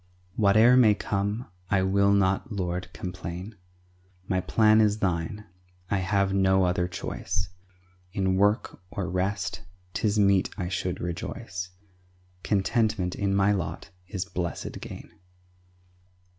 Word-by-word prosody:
Whate'er 110 Hz, +4 st, +6 dB
may 110 Hz, -5 st, +6 dB
come, 100 Hz, +4 st, -2 dB, 0.2 s
I 95 Hz, -2 st, +3 dB
will 100 Hz, +1 st, +3 dB
not, 100 Hz, +5 st, +2 dB
Lord, 90 Hz, -2 st, -3 dB
complain; 90 Hz, +3 st, -6 dB, 0.7 s
My 95 Hz, -2 st, +1 dB
plan 110 Hz, +3 st, +4 dB
is 105 Hz, -1 st, +3 dB
Thine, 95 Hz, +2 st, -2 dB, 0.5 s
I 100 Hz, -, +3 dB
have 95 Hz, +1 st, +1 dB
no 95 Hz, -1 st, +4 dB
other 90 Hz, 0 st, +1 dB
choice. 90 Hz, +1 st, -3 dB, 0.6 s
In 95 Hz, -1 st, +1 dB
work 100 Hz, 0 st, +1 dB
or 100 Hz, -2 st, -3 dB
rest 95 Hz, +1 st, -2 dB, 0.3 s
'tis 105 Hz, -1 st, 0 dB
meet 100 Hz, -2 st, +4 dB
I 90 Hz, -4 st, -2 dB
should 90 Hz, -1 st, -2 dB
rejoice; 90 Hz, +1 st, -5 dB, 0.7 s
Contentment 105 Hz, -2 st, +1 dB
in 100 Hz, -1 st, 0 dB
my 100 Hz, +1 st, +4 dB
lot 95 Hz, -4 st, -3 dB, 0.2 s
is 95 Hz, -1 st, -3 dB
blessed 90 Hz, -1 st, -4 dB
gain. -, -, -9 dB
95 Hz, 120 wpm, -27 LUFS, 90-105 Hz, 0.7 s, Whate'er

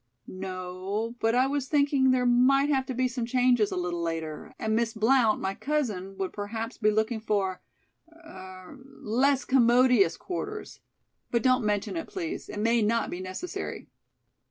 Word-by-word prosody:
"No, 185 Hz, +4 st, -5 dB
but 225 Hz, +1 st, +1 dB
I 255 Hz, +1 st, +4 dB
was 275 Hz, 0 st, -2 dB
thinking 280 Hz, -2 st, +3 dB
there 255 Hz, -1 st, +2 dB
might 260 Hz, +4 st, +4 dB
have 265 Hz, -3 st, +1 dB
to 260 Hz, -, -3 dB
be 255 Hz, +1 st, +1 dB
some 245 Hz, -1 st, -4 dB
changes 245 Hz, -3 st, +2 dB
a -, -, -3 dB
little 175 Hz, -1 st, -2 dB
later, 160 Hz, -2 st, -4 dB
and 220 Hz, 0 st, -1 dB
Miss 230 Hz, 0 st, 0 dB
Blount, 225 Hz, 0 st, +3 dB
my 190 Hz, 0 st, -2 dB
cousin, 210 Hz, -10 st, -3 dB
would 190 Hz, -1 st, -3 dB
perhaps 225 Hz, +3 st, -5 dB
be 215 Hz, -2 st, +3 dB
looking 220 Hz, +2 st, 0 dB
for 200 Hz, -4 st, -1 dB, 0.5 s
er 190 Hz, -, -12 dB, 0.2 s
less 265 Hz, +5 st, +1 dB
commodious 245 Hz, -6 st, +4 dB
quarters. 415 Hz, +3 st, -6 dB, 0.5 s
But 235 Hz, -2 st, 0 dB
don't 255 Hz, -1 st, +3 dB
mention 210 Hz, -, -1 dB
it, 330 Hz, -, -4 dB
please. 365 Hz, -2 st, -5 dB
It -, -, -7 dB
may 230 Hz, +2 st, +2 dB
not 225 Hz, +2 st, +1 dB
be 175 Hz, -, -5 dB
necessary." 185 Hz, -, -6 dB
230 Hz, 160 wpm, -27 LUFS, 195-260 Hz, 0.5 s, I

